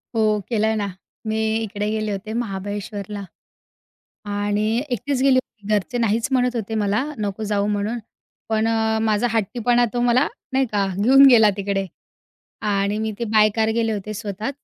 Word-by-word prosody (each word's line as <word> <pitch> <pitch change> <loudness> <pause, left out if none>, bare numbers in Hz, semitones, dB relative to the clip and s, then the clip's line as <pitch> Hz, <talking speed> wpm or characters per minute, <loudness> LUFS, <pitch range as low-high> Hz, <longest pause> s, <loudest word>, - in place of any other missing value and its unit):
हो, 215 -1 +2
केलाय 220 -1 +1
ना. 205 -2 -1 0.4
मी 220 0 -1 0.3
इकडे 210 0 -3
गेले 215 -1 -2
होते 200 +2 -5
महाबळेश्वरला 205 -2 -4 1.1
आणि 205 +3 0
एकटीच 255 +3 -1
गेली 270 -1 +5
होती. 215 -5 -13
घरचे 210 +4 0
नाहीच 225 0 +1
म्हणत 250 -1 +2
होते 220 -1 -3
मला, 210 +2 +1
नको 210 0 -3
जाऊ 200 0 +1
म्हणून. 210 +3 -1 0.5
पण 220 0 +1
अ, 220 -1 +1
माझा 220 +2 +2
हट्टीपणा 240 +3 +2
तो 240 - 0
मला 245 +3 +3 0.3
नाही 265 0 +3
का 205 -2 +1 0.2
घेऊन 270 +4 +7
गेला 220 -4 +7
तिकडे. 195 0 -1 0.8
आणि 200 0 0
मी 220 0 -1
ते 235 - -1
बाय 215 -1 +6
कार 220 -1 +2
गेले 225 -1 +1
होते 210 +1 -5
स्वतः. 210 +1 -4
215 Hz, 160 wpm, -22 LUFS, 205-230 Hz, 1.1 s, घेऊन